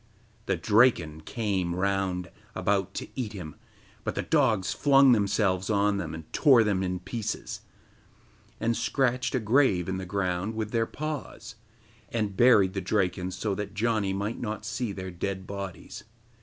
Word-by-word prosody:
The 95 - +2
Draken 85 -5 +3
came 95 -7 -1
round 95 -1 -1 0.2
about 100 -1 0
to - - -4
eat 115 -5 -3
him, 85 -7 -7 0.5
but - - -3
the - - -1
dogs 120 -11 +2
flung 135 -2 +5
themselves 100 -3 +2
on 100 -1 +2
them 80 -4 -4
and 80 - -8
tore 130 -7 +6
them 100 -3 0
in 90 -1 -2
pieces, 110 +4 -4 1.0
and 115 +1 +1
scratched 125 -1 0
a - - +2
grave 110 -6 +3
in 95 0 -2
the 95 -1 -6
ground 95 +2 -1
with 110 -1 -3
their 115 -1 +1
paws, 155 -5 -6 0.6
and 105 -4 -2
buried 105 -5 +5
the 95 - -2
Draken 90 -1 0
so 95 +2 -2
that 100 0 -5
Janni 110 -2 +1
might 100 +4 -3
not 110 -1 -4
see 115 -1 -2
their 95 -1 -6
dead 95 +2 -4
bodies. 100 -3 -7
100 Hz, 155 wpm, -27 LUFS, 95-115 Hz, 1.0 s, tore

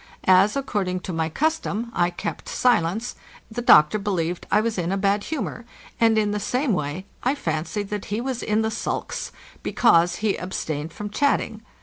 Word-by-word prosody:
As, 190 +4 +5
according 195 -9 -1
to 185 - -5
my 160 -1 -1
custom, 240 - -1
I! 175 0 +2
kept 185 +4 -5
silence, 225 -1 +1 0.4
the 240 - -3
doctor 210 -3 +6
believed 180 -4 -2
that - - +4
Iwas 225 -4 -1
in 175 +1 -1
a 195 - 0
bad 200 +1 +1
humor, 250 - -4 0.4
and 225 -1 +4
in 210 -1 +2
the 210 - -1
same 250 +4 0
way 150 +2 -3 0.2
I 255 +3 +1
fancied 165 - -3
that 210 -1 -3
he 210 +2 -2
was 255 0 -3
in 215 +1 +1
the 220 - 0
sulks, - - -3 0.3
because 175 -7 +3
he 215 -2 0
abstained 160 -4 -4
from 205 +4 -6
chatting. 230 -4 0
205 Hz, 180 wpm, -24 LUFS, 175-230 Hz, 0.4 s, doctor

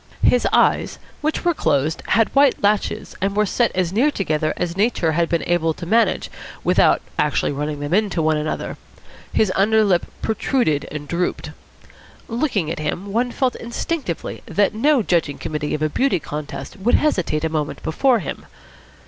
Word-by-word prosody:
His 245 - +4
eyes, - - +2 0.2
which 310 +3 -1
were 345 - +4
closed, 155 - 0
had 225 +1 +2
white 275 -4 +4
lashes 205 +1 0
and 195 +1 0
were 210 0 +3
set 235 +4 +1
as 180 -1 0
near 250 +8 +3
together 155 - -1
as 175 -1 -2
Nature 200 -5 +1
had 170 +1 +1
been 170 - 0
able 165 -2 +1
to 175 - -7
manage 220 +2 +1 0.3
without - - +3 0.2
actually 150 -1 +1
running 145 +1 -3
them 145 +3 -3
into 205 -3 +1
one 155 -1 +2
another. 150 +1 -3 0.5
His 215 -4 +2
under 215 +3 +4
lip 185 -4 +2 0.2
protruded 220 - 0
and 145 -1 -6
drooped. 175 +3 -2 0.8
Looking 230 - -1
at - - -4
him, 180 +6 -4
one 245 +3 +1
felt 255 +1 0
instinctively 235 - -4
that 200 +5 +1
no 260 +3 +3
judging 165 -6 0
committee 150 -1 -3
of 155 - -3
a - - +3
beauty 250 - +1
contest 150 +4 -7
would 220 +6 +3
hesitate 185 - +1
a - - +2
moment 155 -2 -3
before 250 - +2
him. 175 -10 -6
185 Hz, 170 wpm, -21 LUFS, 155-230 Hz, 0.8 s, His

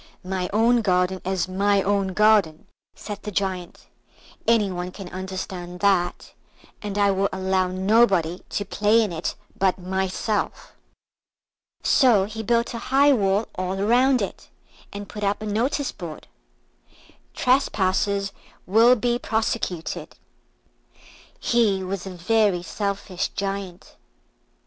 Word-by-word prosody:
"My 185 -1 -2
own 230 +3 +3
garden 185 -2 +1
is 190 -1 -1
my 200 +1 +2
own 195 -1 0
garden," 210 -7 +3 0.3
said 205 -1 -7
the 210 - -5
Giant; 185 -3 -3 0.6
"any 220 -4 +3
one 180 0 -4
can 190 0 -9
understand 185 -1 -6
that, 190 -3 +1 0.5
and 205 -1 -4
I 200 -1 +4
will 195 +1 +1
allow 190 0 0
nobody 190 -2 +2
to 205 - -2
play 210 +3 +3
in 210 - -2
it 165 +1 -3 0.2
but 190 -1 +1
myself." 190 +3 -2 1.1
So 240 -8 +4
he 220 +2 -6
built 235 +3 +1
a 230 - -4
high 280 +2 +5
wall 200 -2 +1
all 185 +1 -3
round 245 +4 +3
it, 195 - -7 0.4
and 205 0 -7
put 210 0 -7
up 200 0 0
a 215 - -6
notice 245 +7 -1
board. 165 -4 -9 1.1
TRESPASSERS 200 -6 +1 0.3
WILL 225 +6 +5
BE 240 +1 0
PROSECUTED 220 -7 -3 1.2
He 215 -5 +2
was 190 0 -4
a 185 - -7
very 195 0 +2
selfish 200 -1 -3
Giant. 195 -2 -5
200 Hz, 125 wpm, -24 LUFS, 185-220 Hz, 1.2 s, high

